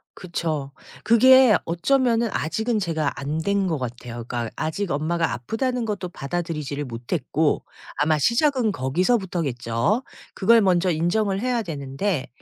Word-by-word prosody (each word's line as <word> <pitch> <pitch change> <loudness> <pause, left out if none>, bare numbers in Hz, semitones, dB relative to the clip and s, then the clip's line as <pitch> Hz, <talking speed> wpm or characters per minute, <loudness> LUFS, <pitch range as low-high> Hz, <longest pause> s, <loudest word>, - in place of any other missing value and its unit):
그쵸. 160 -6 -3 0.3
그게 255 0 +7
어쩌면은 235 +6 +1
아직은 220 +8 -1
제가 160 -6 -1
안 145 +3 -3
된 200 +2 0
것 160 -3 0
같아요. 120 -1 -6
그러니까 120 -2 -3
아직 165 +5 -3
엄마가 165 +3 0
아프다는 230 - -2
것도 195 -4 -3
받아들이지를 150 -2 -4
못했고 130 +5 -1 0.3
아마 150 +1 +2
시작은 240 - +2
거기서부터겠죠. 165 - 0 0.3
그걸 230 +3 +4
먼저 185 -1 +2
인정을 195 +5 0
해야 245 -2 0
되는데 145 -1 -3
170 Hz, 325 characters per minute, -23 LUFS, 145-220 Hz, 0.3 s, 그게